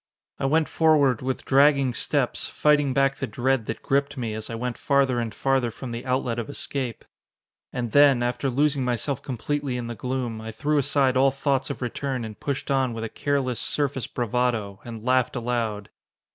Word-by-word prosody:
I - - -1
went 155 +2 +2
forward 145 -7 +3
with 130 0 -3
dragging 140 -1 +4
steps, - - 0
fighting 145 -2 +2
back 135 +1 +2
the - - -3
dread 120 +2 0
that 115 - -5
gripped 140 +1 0
me 115 -4 -3
as 110 0 -5
I 115 - -4
went 120 +1 -3
farther 135 -3 +2
and 115 -2 -2
farther 130 +2 +1
from 120 +2 -8
the 120 +3 -6
outlet 125 -2 0
of 120 - -5
escape. 135 -4 -4 0.7
And 120 -3 -3
then, 140 -4 +5
after 120 +2 -1
losing 140 +1 +1
myself 125 +3 -1
completely 140 0 -3
in 120 - -4
the 120 - -4
gloom, 125 -2 -3
I 110 0 -6
threw 145 +7 0
aside 135 -1 +2
all 135 +1 +5
thoughts 135 0 -1
of - - -4
return 125 0 -3
and 110 -1 -9
pushed 140 0 -3
on 130 -3 +1
with 115 - -4
a 115 - -3
careless, 135 -4 -1
surface 135 -4 -1
bravado, 120 -5 -1
and 115 -2 -8
laughed 130 -1 +2
aloud. 115 -4 -2
130 Hz, 185 wpm, -25 LUFS, 120-140 Hz, 0.7 s, then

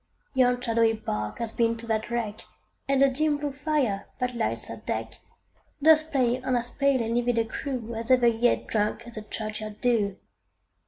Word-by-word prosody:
Yon 250 -2 +3
shadowy 230 -2 +2
bark 105 - -4
hath 230 -1 -4
been 230 -1 +2
to 230 - -8
that 220 -1 -1
wreck, 225 -3 -2 0.5
And 275 0 +2
the 275 - +7
dim 295 +3 +1
blue 290 0 -3
fire, 275 -8 -1
that 250 -1 -2
lights 230 - -1
her - - -7
deck, - - -4 0.6
Doth 315 +1 +5
play 255 -2 +2
on 255 0 0
as 240 0 -1
pale 275 -3 +2
and 225 +1 -2
livid 240 0 +1
a 225 - +2
crew, 235 0 -4
As 225 0 -5
ever 255 -2 +5
yet 235 +1 +3
drank 215 +1 -1
the 215 - -6
churchyard 215 0 -5
dew. 215 -6 +1
235 Hz, 180 wpm, -27 LUFS, 225-260 Hz, 0.6 s, the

